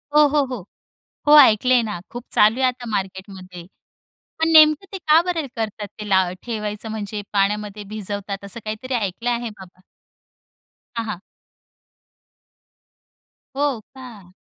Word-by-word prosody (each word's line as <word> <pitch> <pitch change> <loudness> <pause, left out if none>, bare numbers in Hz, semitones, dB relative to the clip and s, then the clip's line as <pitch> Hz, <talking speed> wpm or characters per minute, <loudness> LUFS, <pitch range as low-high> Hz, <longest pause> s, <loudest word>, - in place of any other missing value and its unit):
हो, - - +7
हो, 290 0 +2
हो, 250 -8 -7 0.6
हो, 300 +1 +8
ऐकलंय 250 -1 +5
ना. 210 -5 -4
खूप 240 0 -7
चालू 220 +5 +4
आहे 260 - +4
आता 250 -1 -4
मार्केटमध्ये. 190 -2 -6 0.7
पण 320 0 +1
नेमकं 310 +3 +6
ते 385 - -4
का 315 -2 +5
बरे 345 -4 -2
करतात 215 -2 -4
ते 210 - -6
ला 190 -1 +4 0.2
ठेवायचं? 215 -2 -5
म्हणजे 210 -1 -5
पाण्यामध्ये 205 +1 -1
भिजवतात 200 -1 -5
असं 200 +4 -6
काहीतरी 220 +5 -4
ऐकलं 225 +1 -2
आहे 235 -1 -2
बाबा. 185 -1 -14 1.2
हां, 230 -1 -2
हां. 210 -5 -5 2.4
हो 280 -3 0 0.2
का? 220 -9 -12
215 Hz, 135 wpm, -21 LUFS, 200-255 Hz, 2.4 s, हो